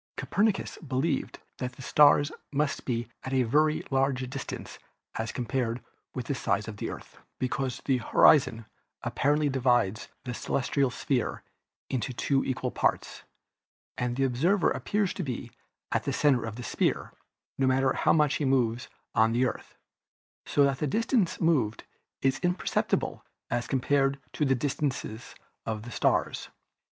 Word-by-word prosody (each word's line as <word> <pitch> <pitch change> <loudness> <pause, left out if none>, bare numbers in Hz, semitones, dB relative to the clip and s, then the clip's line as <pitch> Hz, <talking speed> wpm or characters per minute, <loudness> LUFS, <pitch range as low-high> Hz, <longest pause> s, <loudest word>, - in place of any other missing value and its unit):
Copernicus 205 -1 0
believed 145 +1 -1 0.2
that 125 0 -3
the 130 - -11
stars 145 +1 +5 0.2
must 145 +1 -1
be 120 -2 -1 0.2
at 130 - -4
a 130 -1 +3
very 150 +6 +2
great 135 -2 0
distance 135 -1 -6 0.3
as 110 -1 -3
compared 120 -1 -2 0.4
with - - -3
the - - -1
size - - -1
of - - -7
the - - -3
Earth, - - -10 0.2
because 130 0 -2
the 135 -2 +3
horizon 125 -2 +4 0.4
apparently 150 +2 +1
divides 120 -6 +1 0.2
the 125 - -4
celestial 135 +2 0
sphere 125 -1 -1 0.4
into 130 0 -2
two 135 +2 +1
equal 130 - -2
parts, - - -1 0.7
and 125 0 -1
the 135 - +1
observer 160 +10 +2
appears 205 -3 0
to - - -4
be 125 -6 -4 0.4
at - - 0
the - - -1
center 135 -6 +3
of 115 -1 -5
this 125 0 -6
sphere, - - 0 0.5
no 135 - +3
matter 130 0 +3
how - - +2
much 150 -2 +3
he - - -2
moves 125 -2 +1 0.3
on 115 +1 +4
the 125 +2 +3
Earth, - - -5 0.7
so 145 - +3
that 140 -1 +2
the 150 - 0
distance 225 - +1
moved 135 -11 +1 0.4
is 135 0 +2
imperceptible 180 0 0 0.3
as 120 0 -1
compared 135 +1 +1 0.2
with 150 -3 +2
the 135 - +4
distance 135 +1 -1 0.6
of 110 -1 -3
the 120 - -8
stars. - - 0
135 Hz, 150 wpm, -28 LUFS, 125-145 Hz, 0.7 s, stars